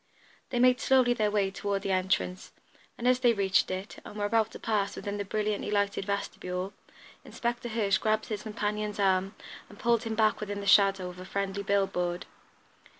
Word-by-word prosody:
They 250 - -2
made 250 +1 +5
slowly 255 -2 +4
their 215 -3 +1
way 200 -2 +1
toward 200 0 -2
the 195 - -1
entrance, 185 0 -1 0.4
and 240 - -2
as 255 0 +4
they 245 -2 +4
reached 195 -3 +2
it, 190 +2 -5
and - - -10
were 205 -1 -1
about 220 0 +2
to - - -8
pass 210 -3 -1
within 205 0 -4
the 205 - -2
brilliantly 210 +1 -2
lighted 200 -1 0
vestibule, 195 -2 -3 0.5
Inspector 240 0 -3
Hirsch 210 -4 +1
grasped 220 0 +1
his 210 -2 -3
companion's 210 -1 -3
arm 195 0 +2 0.3
and 205 - -14
pulled 235 -2 +2
him 225 -1 -3
back 215 -1 +2
within 205 -1 -4
the 200 - -6
shadow 195 -2 +5
of 180 0 -11
a - - -7
friendly 200 +1 -2
bill 200 0 +2
board. 175 -1 -3
205 Hz, 190 wpm, -29 LUFS, 195-220 Hz, 0.5 s, made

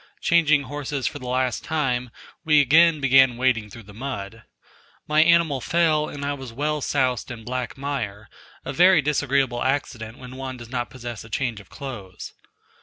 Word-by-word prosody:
Changing 155 -4 +3
horses 145 0 -4
for 145 - -2
the 130 - -8
last 125 -1 -1
time, 130 -6 -1 0.3
we 155 -2 +5
again 155 +3 +5
began 135 -2 +5
wading 120 -4 +1
through 115 +3 -11
the 105 +1 -14
mud. 115 -3 -6 0.7
My 155 +1 +4
animal 165 -4 +3
fell 155 -1 +2
and 140 -1 -6
I 145 - -1
was 135 -4 -8
well 150 +5 -2
soused 130 -3 0
in 120 -2 -8
black 125 +1 -4
mire 115 -7 -4 0.4
a 135 - -4
very 180 0 +5
disagreeable 135 -4 +1
accident 130 -4 -2
when 130 0 -10
one 130 -1 -6
does 120 -1 -11
not 120 -1 -3
possess 120 -3 -7
a 110 - -13
change 120 -1 -2
of 105 - -16
clothes. 115 -10 -8
130 Hz, 175 wpm, -23 LUFS, 120-145 Hz, 0.7 s, we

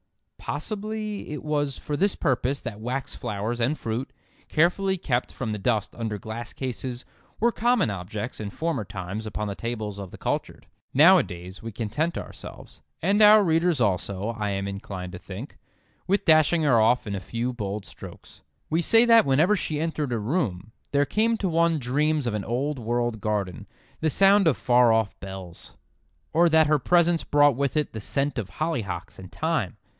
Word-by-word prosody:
Possibly 210 +6 -4
it 150 - -5
was 145 -3 -1
for 150 - -4
this 195 +6 +2
purpose 135 +1 0
that 110 -4 -6
wax 125 +4 -3
flowers 115 +1 -3
and 135 +7 +1
fruit, 115 +4 -4 0.4
carefully 190 +4 +2
kept 125 -7 -1
from 115 -4 -4
the 105 - -3
dust 105 -1 0
under 110 -3 -3
glass 110 +3 -7
cases, 125 -1 -5 0.3
were 235 +2 +3
common 235 - +2
objects 100 +5 -5
in 105 -2 -4
former 160 0 -2
times 100 +2 -6
upon 105 0 -3
the 100 - -3
tables 110 -3 -4
of 100 -2 -6
the - - -11
cultured. - - -3 0.3
Nowadays 115 - +4
we 115 - -6
content 120 - -2
ourselves—and 200 +5 -4
our 210 0 +8
readers 165 -2 +2
also, 100 -1 0
I 110 -3 -2
am 100 0 -2
inclined 95 -2 -6
to 90 - -8
think—with 135 - -6
dashing 160 +1 +4
her 125 -7 +4
off 120 +3 +3
in 100 - -4
a 100 - -2
few 115 +6 -3
bold 105 -3 -4
strokes. - - -12 0.3
We 165 +2 +2
say 225 +6 +5
that 230 -7 +6
whenever 155 +10 +4
she 155 -6 -2
entered 155 -4 -2
a 120 - 0
room 110 - -2 0.2
there 145 0 +3
came 225 - +1
to 200 - -1
one 165 -1 +2
dreams 150 +3 0
of 120 - -1
an 105 -2 -2
old 135 +6 -2
world 120 -1 -1
garden, 100 -5 -2 0.3
the 160 - +1
sound 195 +3 +5
of 155 - +3
far 120 -1 +4
off 110 -2 +1
bells. 95 -3 -10 0.6
Or 170 +1 +5
that 160 0 +5
her 150 0 +3
presence 170 +2 +3
brought 145 -2 +4
with 140 +3 -1
it 150 - 0
the 110 - -5
scent 140 +4 -1
of 100 -4 -5
hollyhocks 110 - -4
and 95 0 -11
thyme. 155 - -1
125 Hz, 175 wpm, -25 LUFS, 105-160 Hz, 0.6 s, our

